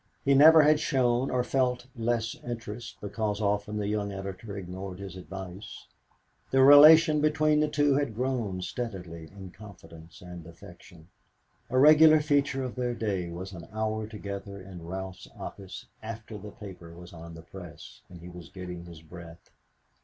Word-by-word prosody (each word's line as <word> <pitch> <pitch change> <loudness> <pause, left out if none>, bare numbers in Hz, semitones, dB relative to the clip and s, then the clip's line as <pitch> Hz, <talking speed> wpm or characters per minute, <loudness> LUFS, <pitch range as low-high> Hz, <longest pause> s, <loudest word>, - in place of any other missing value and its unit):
He 140 - +4
never 155 +3 +8
had 150 0 +4
shown 130 -3 +1
or 125 -1 0
felt 125 -1 0
less 115 -1 -1
interest 115 -1 -7
because 105 0 -3
often 105 0 -1
the 105 - -2
young 105 -1 -2
editor 100 +1 -7
ignored 95 0 -7
his 95 -2 -8
advice. 95 +1 -9 0.6
The 135 0 +4
relation 150 +2 +8
between 155 0 +2
the 150 - +2
two 145 -1 +2
had 140 -5 -1
grown 115 -7 -2
steadily 90 -6 -6
in 95 -2 -11
confidence 85 -4 -14
and 90 -2 -10
affection. 85 0 -15 0.6
A 130 - -1
regular 155 +3 +7
feature 145 -2 0
of 125 - -5
their 125 -1 -2
day 95 -6 -2
was 95 +3 -7
an 85 -2 -10
hour 110 0 -2
together 100 -2 -7
in 90 -3 -11
Ralph's 95 0 -7
office 95 -2 -9 0.2
after 110 0 -8
the 105 0 -8
paper 95 -6 -11
was 90 0 -13
on 85 0 -10
the 80 - -11
press, 90 -1 -12
and 85 -2 -12
he 85 - -10
was 90 -2 -11
getting 90 -2 -8
his 85 -2 -12
breath. 85 +1 -13
105 Hz, 160 wpm, -28 LUFS, 90-125 Hz, 0.6 s, never